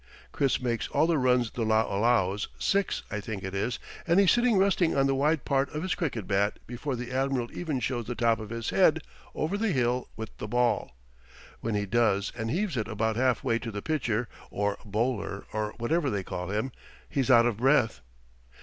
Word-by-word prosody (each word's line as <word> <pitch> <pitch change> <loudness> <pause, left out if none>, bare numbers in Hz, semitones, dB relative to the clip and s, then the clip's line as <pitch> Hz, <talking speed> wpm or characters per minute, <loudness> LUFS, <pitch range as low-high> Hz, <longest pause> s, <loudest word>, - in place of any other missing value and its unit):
Chiz 135 -2 +2
makes 120 -2 -1
all 145 +3 +2
the 165 -3 +2
runs 125 -2 +2
the 120 - -5
law 110 0 +3
allows 105 -2 +2
six, 200 -1 0
I 105 - -2
think 105 -1 -5
it 95 0 -5
is 105 +5 -1 0.3
and 170 +3 +4
he's 195 -2 +6
sitting 240 -3 +3
resting 190 -5 +3
on 135 - +4
the 135 - +2
wide 145 +3 +1
part 135 0 +1
of 155 - -2
his 185 - 0
cricket 125 - -2
bat 100 +2 +1
before 125 +3 -4
the 125 +1 -6
admiral 130 -2 0
even 155 -7 -2
shows 120 -3 -2
the 120 - -3
top 115 -1 +2
of 110 -1 -7
his 115 0 -3
head - - +4 0.3
over 180 +7 -1
the 220 -2 +1
hill 125 -3 0
with 110 -1 -7
the 105 - -4
ball. 120 - +1 0.6
When 115 -2 -2
he 105 0 0
does 105 -1 +2
and 115 -2 -3
heaves 175 - -1
it 110 - -1
about 110 0 -1
half 130 +2 +1
way 115 -4 +1
to 120 - -5
the 105 -2 -5
pitcher, 120 -7 0 0.2
or 100 0 -1
bowler, 105 -2 -2
or 105 0 -2
whatever 145 +6 0
they 100 -4 -2
call 90 0 -5
him, 110 +6 -1 0.4
he's 135 -2 -1
out 120 -2 +7
of 120 -4 0
breath. 130 -2 +3
120 Hz, 205 wpm, -28 LUFS, 110-140 Hz, 0.6 s, out